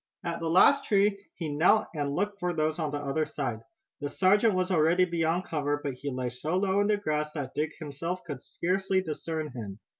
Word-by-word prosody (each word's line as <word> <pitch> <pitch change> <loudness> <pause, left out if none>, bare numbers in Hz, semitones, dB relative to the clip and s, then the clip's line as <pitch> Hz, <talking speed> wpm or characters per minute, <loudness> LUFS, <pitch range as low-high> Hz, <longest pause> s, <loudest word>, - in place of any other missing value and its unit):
At 170 -1 -3
the 165 - -2
last 235 +11 +5
tree 200 0 +2
he 165 - -4
knelt 180 +8 +4
and 145 -2 -2
looked 200 +2 -1
for 180 -2 -1
those 155 +1 0
on 155 -2 0
the 145 - -3
other 145 +2 -1
side. 135 -7 -3 0.4
The 145 - -3
sergeant 200 +6 +3
was 185 +1 0
already 170 +2 +4
beyond 170 0 0
cover, 145 -2 -1
but 140 - -2
he 130 +3 -5
lay 130 -2 -2
so 150 +9 -2
low 195 +1 +2
in 205 - +2
the 210 -1 +3
grass 150 -6 -1
that 140 -4 -5
Dick 150 +1 -1
himself 165 +4 -5
could 145 -7 -6
scarcely 190 +1 0
discern 155 -1 -4
him. 105 -6 -7
160 Hz, 210 wpm, -28 LUFS, 145-185 Hz, 0.4 s, last